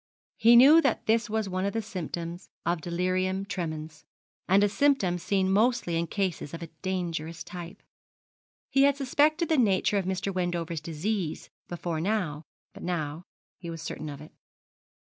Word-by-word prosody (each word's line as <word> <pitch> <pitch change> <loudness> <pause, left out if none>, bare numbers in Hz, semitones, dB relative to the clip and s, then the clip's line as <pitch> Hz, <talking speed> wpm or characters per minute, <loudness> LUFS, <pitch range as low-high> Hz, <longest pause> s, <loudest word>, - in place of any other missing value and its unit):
He 235 +1 +6
knew 285 +7 +9
that 270 -7 0
this 225 +1 +2
was 220 -1 -1
one 185 0 -2
of 200 - -1
the 225 - -1
symptoms 175 -2 -6 0.2
of 170 -1 0
delirium 185 +3 -1
tremens, 155 -5 -5 0.4
and 195 +2 +5
a - - +5
symptom 205 -5 +2
seen 190 +1 +1
mostly 220 -3 +2
in 170 +1 0
cases 180 -5 -2
of 165 - -7
a 165 - -8
dangerous 170 -3 -3
type. 175 -1 -9 0.9
He 270 - +4
had 280 0 +4
suspected 300 +5 +2
the 315 -3 +2
nature 200 -2 +3
of 190 - -3
Mr. 190 +1 -2
Wendover's 175 -3 -2
disease 165 +2 -3 0.2
before 170 -2 -3
now; 180 -6 -1 0.3
but - - -12
now 160 -3 -3 0.4
he 170 - -7
was 165 -1 -6
certain 155 - -5
of 140 0 -8
it. 150 - -12
185 Hz, 165 wpm, -28 LUFS, 170-215 Hz, 0.9 s, knew